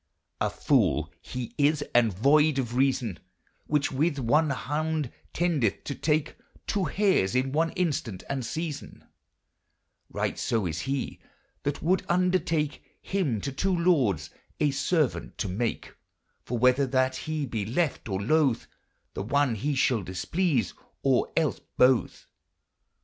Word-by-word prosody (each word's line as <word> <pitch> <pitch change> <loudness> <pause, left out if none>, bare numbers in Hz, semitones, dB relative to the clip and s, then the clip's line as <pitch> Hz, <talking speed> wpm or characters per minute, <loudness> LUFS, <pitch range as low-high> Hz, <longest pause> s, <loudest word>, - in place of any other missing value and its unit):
A - - +1
fole - - +1
he 125 -2 -6
is 145 +1 +3
and 120 -2 +4
voyde 145 - +4
of 120 -3 -2
reason 125 -7 +1 0.5
Whiche 145 -2 +1
with 145 +3 +1
one 145 +5 +2
kounde 150 +1 -2 0.2
tendyth 155 - 0
to 140 - -4
take 155 +1 0 0.3
Two 200 -3 0
harys 175 - +2
in 130 +1 +1
one 160 +3 +2
instant 140 - -2
and 135 -2 -2
season; 155 +5 -5 1.1
Rigktso 110 -6 -1
is 80 -1 -3
he 135 -1 -2 0.4
that 145 0 -3
wolde 180 +3 +2
undertake 175 -4 +1 0.2
Hym 150 - -1
to 140 - -3
two 180 +7 0
lordes 125 - +2 0.3
a 150 -2 +3
servaunt 145 +1 0
to 105 - -2
make; 110 +5 -3 0.5
For 120 - -3
whether 125 +3 +4
that 130 0 +1
he 155 0 -3
be 115 -5 -3
lefe 135 - 0
or 95 -1 -1
lothe, 135 +3 +2 0.5
The - - -4
one 140 +4 +1
he 140 +7 -1
shall 125 -3 +2
displease, 125 - -1 0.3
or - - +2
els - - +1 0.2
bothe. 125 -1 +4
140 Hz, 135 wpm, -27 LUFS, 120-155 Hz, 1.1 s, and